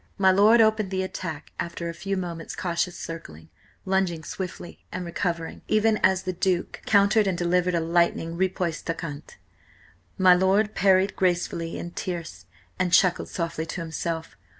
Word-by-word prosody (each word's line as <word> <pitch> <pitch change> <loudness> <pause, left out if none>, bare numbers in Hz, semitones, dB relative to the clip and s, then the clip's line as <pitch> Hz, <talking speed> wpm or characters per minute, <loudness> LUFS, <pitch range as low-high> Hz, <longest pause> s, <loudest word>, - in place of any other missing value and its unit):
My 190 -1 +5
lord 210 +5 +6
opened 220 -2 +3
the 190 0 -1
attack 160 -5 -6
after 170 0 -4
a 170 - -4
few 195 +3 -3
moments' 170 -3 -5
cautious 175 0 -2
circling, 80 - -8 0.4
lunging 190 -4 0
swiftly 180 +1 -7
and 180 0 -4
recovering, 170 -1 -3
even 215 0 +3
as 190 -1 +2
the 185 - -2
Duke 180 0 -1
countered 205 +1 +4
and 185 -2 0
delivered 180 +1 +1
a - - +2
lightning 165 0 +1
riposte 180 -3 -2
en 165 - +1
quinte. 150 -3 -8 0.8
My 185 -2 +7
lord 195 +4 +2
parried 190 0 +3
gracefully 175 -2 -1
in 175 - -6
tierce, 165 - -6 0.3
and 185 -1 +1
chuckled 180 0 +3
softly 165 -2 -3
to 175 - -5
himself. 165 0 -4
180 Hz, 155 wpm, -25 LUFS, 170-190 Hz, 0.8 s, My